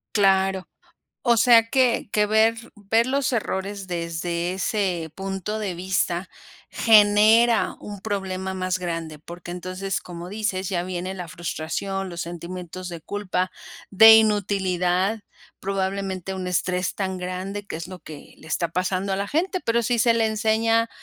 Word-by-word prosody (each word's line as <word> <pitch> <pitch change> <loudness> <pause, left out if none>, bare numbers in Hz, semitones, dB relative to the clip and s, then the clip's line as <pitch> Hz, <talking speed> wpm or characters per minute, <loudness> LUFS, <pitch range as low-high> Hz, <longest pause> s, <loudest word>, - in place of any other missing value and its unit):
Claro. 190 -1 +2 0.5
O 235 -2 +3
sea, 230 -1 +6
que 255 -5 +2
que 210 -1 +3
ver 220 +2 +3 0.2
ver 220 +3 +1
los 270 +1 0
errores 200 -3 -3
desde 170 0 -3
ese 185 -4 -1
punto 195 +3 -4
de 195 -5 -3
vista 180 0 -1 0.4
genera 220 +2 +5
un 205 -2 -8
problema 190 -2 -3
más 185 0 -1
grande. 165 -3 -4
Porque 175 +2 -9
entonces, 185 +2 -4
como 175 0 -8
dices: 200 -3 -2
"Ya 175 -2 0
viene 185 +1 -4
la 180 -2 -6
frustración, 185 +2 -4
los 170 -1 -5
sentimientos 175 +1 -7
de 170 -1 -7
culpa, 185 0 -2 0.4
de 220 +3 +9
inutilidad", 195 -2 +1 0.4
probablemente 195 -1 -2
un 185 -1 -4
estrés 180 +1 -1
tan 190 -2 -3
grande, 185 +3 -5
que - - -5
es 165 +1 -6
lo 185 -1 -9
que 155 -4 -12
le 160 - -14
está 170 +1 -1
pasando 185 +2 -1
a - - +1
la 200 +1 -2
gente. 365 - 0
Pero 235 +1 +1
sí 235 +1 +1
se 230 0 +4
le 225 -1 +2
enseña 225 +1 +2
190 Hz, 150 wpm, -24 LUFS, 180-215 Hz, 0.5 s, de